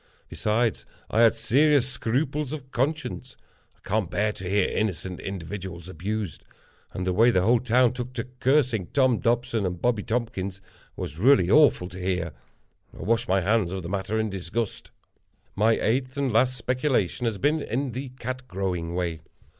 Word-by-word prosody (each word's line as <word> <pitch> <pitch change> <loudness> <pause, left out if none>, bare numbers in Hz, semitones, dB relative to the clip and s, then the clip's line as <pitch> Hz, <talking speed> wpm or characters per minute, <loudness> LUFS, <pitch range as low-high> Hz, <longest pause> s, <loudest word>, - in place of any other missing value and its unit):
Besides, 110 +1 0 0.3
I 115 - +3
had 115 -1 +6
serious 130 +4 +3
scruples 135 +3 -1
of 135 -3 -8
conscience. 130 -1 -2 0.4
I - - -18
can't 100 -2 0
bear 105 +4 +1
to 95 -3 -7
hear 100 0 +2
innocent 95 -3 -2
individuals 90 -2 -6
abused—and 95 0 -6
the 90 - +1
way 115 +6 +5
the 90 -6 +3
whole 120 +4 +4
town 125 0 +3
took 125 0 -5
to 115 - -3 0.2
cursing 130 - +2
Tom 130 -4 +2
Dobson 120 -2 0
and 90 -2 -2
Bobby 120 -1 +1
Tompkins 100 -5 -3 0.4
was 85 -4 -6
really 100 -5 +5
awful 145 -11 +5
to 90 +1 -9
hear. 90 -4 -1 0.7
I - - -5
washed 115 +3 +1
my 95 +1 +3
hands 100 -1 +1
of 95 -1 -4
the 85 - -6
matter 100 +2 -2
in 110 -1 0
disgust. 100 +4 -3 0.7
My 110 +3 +4
eighth 130 +5 0
and 135 -4 0
last 130 +3 +3
speculation 125 - 0
has 110 -3 -1
been 150 +7 +1
in 130 +1 -2
the 130 +3 -5
Cat 130 +1 -5
Growing 90 -4 -3
way. 85 -3 -2
110 Hz, 165 wpm, -26 LUFS, 95-125 Hz, 0.7 s, had